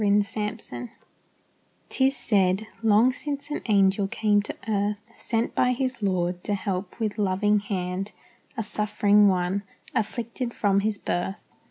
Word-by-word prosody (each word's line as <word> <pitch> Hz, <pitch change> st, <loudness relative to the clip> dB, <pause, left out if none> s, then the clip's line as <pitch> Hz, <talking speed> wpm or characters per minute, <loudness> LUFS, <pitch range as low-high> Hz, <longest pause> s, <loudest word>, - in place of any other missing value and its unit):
THE 205 Hz, -, +3 dB
MOSS 205 Hz, 0 st, +2 dB
ROSE 210 Hz, -, -4 dB, 1.0 s
'Tis 270 Hz, 0 st, +2 dB
said, 200 Hz, -4 st, +2 dB, 0.2 s
long 225 Hz, +3 st, +5 dB
since 285 Hz, +2 st, -5 dB
an -, -, -2 dB
angel 195 Hz, -1 st, +3 dB
came 205 Hz, 0 st, +2 dB
to 205 Hz, -, -5 dB
earth, 205 Hz, 0 st, 0 dB
Sent 230 Hz, 0 st, -1 dB
by 250 Hz, 0 st, +3 dB
his 255 Hz, -1 st, -2 dB
Lord, 180 Hz, -2 st, 0 dB
to 205 Hz, -, 0 dB
help 190 Hz, 0 st, -4 dB
with 215 Hz, -1 st, -2 dB
loving 205 Hz, +1 st, +2 dB
hand 195 Hz, 0 st, -3 dB, 0.5 s
A 225 Hz, -, -1 dB
suffering 210 Hz, -1 st, +3 dB
one, 185 Hz, +1 st, +1 dB, 0.3 s
afflicted 235 Hz, +1 st, -2 dB
from 200 Hz, -2 st, +2 dB
his 210 Hz, +1 st, 0 dB
birth. 190 Hz, +1 st, -3 dB
205 Hz, 145 wpm, -26 LUFS, 195-225 Hz, 1.0 s, long